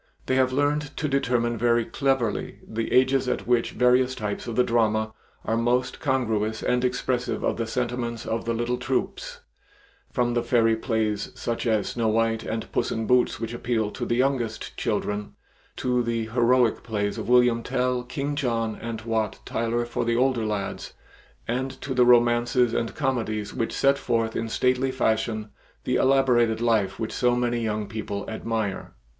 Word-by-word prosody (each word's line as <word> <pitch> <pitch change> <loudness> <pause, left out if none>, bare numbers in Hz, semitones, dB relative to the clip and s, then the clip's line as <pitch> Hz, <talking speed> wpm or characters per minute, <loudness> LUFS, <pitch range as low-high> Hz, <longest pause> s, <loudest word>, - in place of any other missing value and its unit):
They - - 0
have 130 -1 +3
learned 145 +2 0
to 155 - -1
determine 120 -4 0
very 120 0 +3
cleverly 135 -5 -1
the 115 +1 -3
ages 130 0 +3
at 125 - -2
which 120 -1 +2
various 125 +1 +3
types 105 +2 -4
of 115 - -4
the 125 - +4
drama 110 -2 +1 0.3
are 115 - 0
most 120 +2 0
congruous 110 -6 0
and 125 0 +1
expressive 125 0 -1
of - - 0
the 115 -1 -2
sentiments 120 -1 -3
of 115 0 -2
the 115 - 0
little 120 +2 -1
troupes, - - -3 0.7
from 120 -1 +1
the 120 - +1
fairy 115 -1 +3
plays 110 -3 -1
such 120 +1 -3
as 110 -3 +1
"Snow 115 -2 -1
White" 115 0 +1
and 110 0 -4
"Puss - - 0
in 115 0 -2
Boots" 125 +2 +2
which 115 0 -4
appeal 115 -3 -1
to - - -6
the 120 - 0
youngest 125 -3 -1
children, 105 0 -2 0.4
to 125 -1 0
the 115 -1 -1
heroic 120 0 +3
plays 105 -3 -2
of - - -5
"William 125 -1 +4
Tell," 125 +1 0
"King 140 +4 -3
John," 115 -6 -1
and 115 -1 -5
"Wat 110 -2 -1
Tyler" 115 +1 -1
for 120 - -2
the 115 0 +1
older 125 -3 +2
lads, 105 -2 -4 0.5
and 130 +3 -1
to 135 - -3
the 125 -1 +4
romances 120 0 +4
and 115 - -2
comedies 115 -7 -2
which 115 -3 -2
set 140 0 +2
forth 115 -3 0
in 115 0 -2
stately 125 +3 +1
fashion 110 -3 0 0.3
the - - +1
elaborated 125 -4 +3
life 110 -5 +1
which 110 - -3
so 125 -1 +2
many 120 -1 0
young 105 -1 -1
people 100 -1 -5
admire. 110 -3 -3
120 Hz, 170 wpm, -25 LUFS, 110-125 Hz, 0.7 s, the